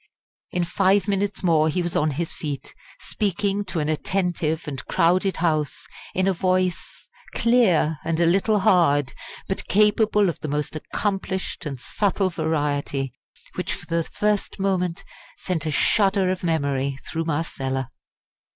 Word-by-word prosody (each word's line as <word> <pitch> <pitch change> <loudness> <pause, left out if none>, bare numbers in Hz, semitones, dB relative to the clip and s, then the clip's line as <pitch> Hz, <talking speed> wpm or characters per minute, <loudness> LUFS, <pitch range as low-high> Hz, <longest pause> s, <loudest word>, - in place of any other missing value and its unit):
In 180 - -1
five 195 +2 +2
minutes 200 0 -1
more 160 -3 +4
he 180 +3 0
was 175 - -3
on 155 +1 +2
his 160 +3 -3
feet, 145 -3 -5 0.3
speaking 200 0 -1
to 185 -3 -3
an 150 - -1
attentive 165 -1 -1
and 140 -3 -5
crowded 185 +3 +2
House 155 -3 0 0.3
in 185 +1 +2
a 195 - +3
voice 185 0 -1 0.3
clear, 195 -11 +3
a 165 - -2
little 190 +6 +3
hard, 145 -8 +3 0.3
but 190 - -3
capable 210 0 +3
of 170 - -2
the - - -5
most 150 +1 -2
accomplished 190 +1 -3
and 135 -3 -5
subtle 195 - 0
variety 145 -4 -1 0.4
which - - -2
for - - -10
the 170 0 0
first 210 +4 -1
moment 180 -3 0 0.3
sent 165 -5 -2
a - - 0
shudder 195 +4 +3
of 185 -1 -4
memory 140 -5 0
through 165 0 -2
Marcella. 135 -5 -2
175 Hz, 140 wpm, -23 LUFS, 155-195 Hz, 0.4 s, more